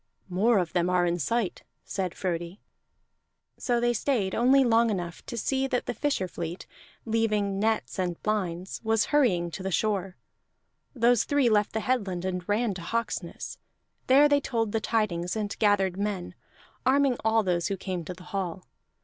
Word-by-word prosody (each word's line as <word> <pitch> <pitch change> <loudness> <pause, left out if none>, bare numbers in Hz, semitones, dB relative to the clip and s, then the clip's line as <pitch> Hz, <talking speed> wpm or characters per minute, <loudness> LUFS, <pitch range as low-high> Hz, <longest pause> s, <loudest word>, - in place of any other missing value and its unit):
"More 210 +6 +3
of 180 -4 -1
them 175 0 +1
are 180 -1 +3
in 175 0 0
sight," 225 - -1 0.2
said 185 -3 -3
Frodi. 175 0 -3 1.0
So 240 -2 +1
they 240 0 +2
stayed 225 -5 0
only 265 +3 +5
long 230 -1 +4
enough 175 -4 -4
to 235 - -5
see 265 +4 0
that 250 -2 -1
the - - -2
fisher 280 -9 -1
fleet, 170 0 -6 0.4
leaving 215 -3 0
nets 220 -1 0
and 175 -2 -1
lines, 190 -4 -2
was 220 -1 +2
hurrying 180 -13 +3
to 165 - -6
the 190 - -2
shore. 195 -1 -1 0.8
Those 240 -1 +4
three 285 -4 +2
left 210 -1 +2
the 220 - -1
headland 200 -8 -1
and 180 0 -3
ran 215 +1 +1
to 180 - -7
Hawksness; 210 -3 -4 0.5
there 275 +3 +7
they 285 -1 +3
told 225 -5 -1
the 225 - 0
tidings 200 -6 0
and 210 -2 -2
gathered 195 -3 +2
men, 200 -3 -3 0.5
arming 270 -1 +3
all 220 0 +3
those 175 -3 0
who 195 - -2
came 185 -2 -4
to 180 - -5
the 180 - -13
hall. 185 -2 -3
205 Hz, 170 wpm, -27 LUFS, 180-230 Hz, 1.0 s, there